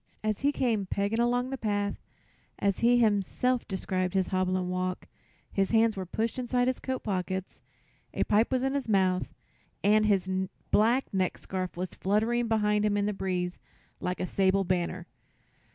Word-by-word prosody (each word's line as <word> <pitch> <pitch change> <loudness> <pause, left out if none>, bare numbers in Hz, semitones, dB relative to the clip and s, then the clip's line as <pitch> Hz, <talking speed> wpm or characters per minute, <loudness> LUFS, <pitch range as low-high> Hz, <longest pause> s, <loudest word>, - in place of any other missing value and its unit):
As 215 -1 0
he 285 +1 +2
came 225 -8 0
"pegging" 200 +4 -1
along 245 +2 +1
the 270 - -4
path, 205 -2 -1 0.6
as 200 -1 0
he 240 +1 +4
himself 230 +3 +1
described 185 -1 -2
his 190 -1 +1
hobbling 185 -1 0
walk, 185 0 -2 0.5
his 195 -1 +1
hands 225 -1 +3
were 190 -2 -5
pushed 225 +6 -2
into 250 0 -1
his 255 0 0
coat 260 -1 -3
pockets, 190 -2 -3 0.5
a - - 0
pipe 215 +4 +2
was 255 -1 +1
in 270 0 0
his 280 -4 -2
mouth 185 -3 +2 0.5
and 215 +1 +4
his 195 -3 +2 0.4
black 235 +5 +4
neckscarf 185 -1 -2
was 180 +1 -4
fluttering 225 +5 +1
behind 210 -2 +2
him 210 -1 +2
in 200 - +1
the 210 - 0
breeze 180 -2 -2 0.4
like 180 0 -3
a - - -1
sable 195 +1 +2
banner. 180 -1 -1
205 Hz, 165 wpm, -29 LUFS, 185-230 Hz, 0.6 s, he